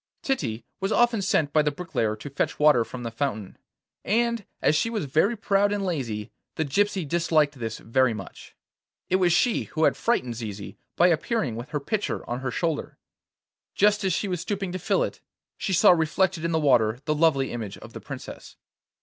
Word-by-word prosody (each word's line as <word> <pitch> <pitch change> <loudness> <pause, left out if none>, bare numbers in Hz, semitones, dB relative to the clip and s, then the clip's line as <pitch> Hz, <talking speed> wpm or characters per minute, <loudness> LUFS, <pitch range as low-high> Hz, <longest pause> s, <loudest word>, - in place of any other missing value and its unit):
Titty 120 - -2
was 195 +2 -1
often 235 -3 +3
sent 155 -6 +1
by 155 - +5
the 150 - +1
bricklayer 145 -9 -2
to 110 +7 -9
fetch 140 - -1
water 150 -6 +5
from 125 +2 -8
the 115 - -4
fountain, 115 -5 -3 0.5
and 235 0 0
as 150 - +3
she 230 - +1
was 215 -8 -2
very 160 - +2
proud 205 -1 +2
and 205 -1 -1
lazy 120 - -3 0.2
the 160 - -1
gypsy 190 +3 0
disliked 155 -3 +1
this 115 -1 -4
very 130 +2 +2
much. 95 -3 -10 0.6
It 185 - +5
was 180 -2 +3
she 220 +7 +2
who 160 - -2
had - - +4
frightened 125 - 0
Zizi 105 -4 -6 0.2
by 175 +1 +5
appearing 165 - 0
with 120 +5 -7
her 150 - -2
pitcher 210 +9 -3
on 120 +1 -3
her 130 0 -3
shoulder. 160 +4 -2 0.8
Just 210 0 +3
as 190 - +1
she 205 - -1
was 180 -3 -2
stooping 195 0 -3
to 185 - -4
fill - - +1
it, - - -5 0.3
she - - -3
saw 180 - +6
reflected 175 +1 +1
in 170 - 0
the 160 - +2
water 120 -6 +3
the 155 - +1
lovely 150 -4 +2
image 110 -5 -5
of - - -13
the - - -8
Princess. - - -9
160 Hz, 195 wpm, -25 LUFS, 125-195 Hz, 0.8 s, saw